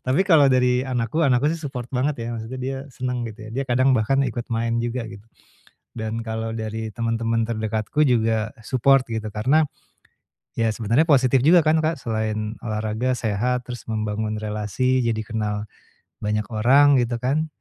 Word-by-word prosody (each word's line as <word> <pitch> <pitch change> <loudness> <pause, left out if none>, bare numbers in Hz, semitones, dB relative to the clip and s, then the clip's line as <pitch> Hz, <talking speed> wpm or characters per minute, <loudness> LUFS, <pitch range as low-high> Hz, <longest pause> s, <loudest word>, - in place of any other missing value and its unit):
Tapi 130 +6 +1
kalau 155 -7 +5
dari 125 -1 +3
anakku, 125 +4 -1
anakku 140 0 +3
sih 165 - -5
support 135 -5 -5
banget, 130 -1 -1
ya. - - -4
Maksudnya 115 +3 -6
dia 135 +1 -2
seneng, 125 -2 -3
gitu 110 0 -10
ya. 110 - -9
Dia 135 +3 -2
kadang 130 +2 +3
bahkan 135 +4 +2
ikut 120 -1 -4
main 115 0 -1
juga, 120 +1 -3
gitu. 100 -2 -9 0.8
Dan 110 +1 -3
kalau 110 0 -4
dari 110 0 -5
temen-temen 115 0 0
terdekatku 110 +5 0
juga 110 -2 +1
support, 135 +2 +3
gitu. 110 -1 -3
Karena, 135 +9 +3 0.9
ya 115 -2 +1
sebenarnya 115 +9 +2
positif 135 -3 +4
juga 170 +1 +7
kan, 155 +1 +3
Kak, 160 -3 -1
selain 110 -1 -2
olahraga, 110 +2 -2
sehat, 125 +2 -1
terus 120 - -7
membangun 110 -1 -2
relasi, 105 +4 -1
jadi 110 -1 0
kenal 105 -2 -3 0.5
banyak 105 0 -1
orang, 135 +5 +5
gitu 120 -1 -1
kan. 145 +5 +1
115 Hz, 165 wpm, -23 LUFS, 110-130 Hz, 0.9 s, juga